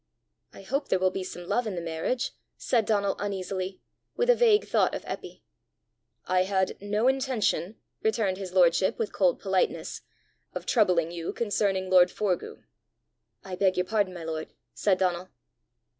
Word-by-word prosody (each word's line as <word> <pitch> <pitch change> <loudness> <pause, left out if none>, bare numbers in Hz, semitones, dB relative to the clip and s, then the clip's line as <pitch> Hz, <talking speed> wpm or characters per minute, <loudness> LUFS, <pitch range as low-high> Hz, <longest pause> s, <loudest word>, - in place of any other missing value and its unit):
"I - - -13
hope 275 +8 -2
there - - +3
will 185 0 +2
be 190 - -4
some 175 -1 -8
love 245 +3 0
in 205 - -3
the - - -2
marriage!" 165 +9 -2 0.3
said 230 -4 +1
Donal 200 -2 +1
uneasily, 190 -1 -4 0.4
with 485 +1 +4
a - - +4
vague 450 -3 +4
thought - - +2
of - - -6
Eppy. - - -7 0.8
"I 185 0 +2
had 190 -1 0
no 210 +4 0
intention," 255 -7 0 0.3
returned 220 -4 0
his 190 -2 -6
lordship 180 0 +3
with 225 - -3
cold 185 -3 +2
politeness, 190 -1 -1 0.5
"of - - -5
troubling 180 -8 +2
you 170 -1 -4
concerning 200 -4 0
lord 180 -1 +6
Forgue!" 195 -4 -3 0.8
"I 185 -1 -6
beg 190 0 +2
your 180 - +1
pardon, 200 -2 0
my 170 - -7
lord," 160 -1 -5 0.2
said 195 -3 +2
Donal. 180 -1 -1
190 Hz, 160 wpm, -27 LUFS, 180-215 Hz, 0.8 s, lord